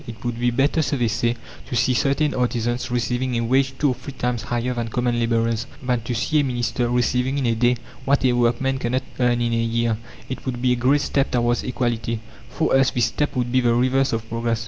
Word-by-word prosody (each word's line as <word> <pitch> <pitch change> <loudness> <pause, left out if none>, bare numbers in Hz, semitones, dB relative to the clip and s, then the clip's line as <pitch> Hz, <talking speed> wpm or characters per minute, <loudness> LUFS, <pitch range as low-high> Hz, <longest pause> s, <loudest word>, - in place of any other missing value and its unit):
"It 115 0 -9
would 120 -1 -2
be 120 0 +2
better," 135 +6 +2
so 145 -1 0
they 120 -2 +1
say, 115 +2 0 0.3
"to - - -4
see 120 +2 +3
certain 140 +4 +1
artisans 120 -1 -1
receiving 125 +1 -1
a 115 - +1
wage 130 +2 +2
two 145 - +2
or - - +1
three 135 - -9
times 125 -2 -2
higher 120 +3 -2
than 120 -1 -3
common 120 +1 0
labourers, 115 0 0 0.2
than 125 -2 0
to 120 +2 -3
see 150 +6 +1
a - - +3
minister 120 -2 -1
receiving 125 +2 +1
in 135 - 0
a 115 - +2
day 120 +2 +2 0.3
what 140 +1 +2
a 125 - +5
workman 120 +2 +1
cannot 130 +1 -1 0.2
earn 120 -1 +2
in 120 -1 0
a - - +1
year. 115 -1 0 0.3
It 130 - -6
would 125 -2 -2
be 125 0 +2
a - - +3
great 130 +4 +2
step 140 -1 0
towards 120 0 +1
equality." 115 -2 -2 0.3
For 160 - +1
us 135 -1 +4
this 120 - +1
step 150 - -1
would 125 -1 -1
be 130 - +3
the 120 -1 +2
reverse 130 +2 +2
of 115 0 -3
progress. 115 0 -1
120 Hz, 235 wpm, -22 LUFS, 115-130 Hz, 0.3 s, a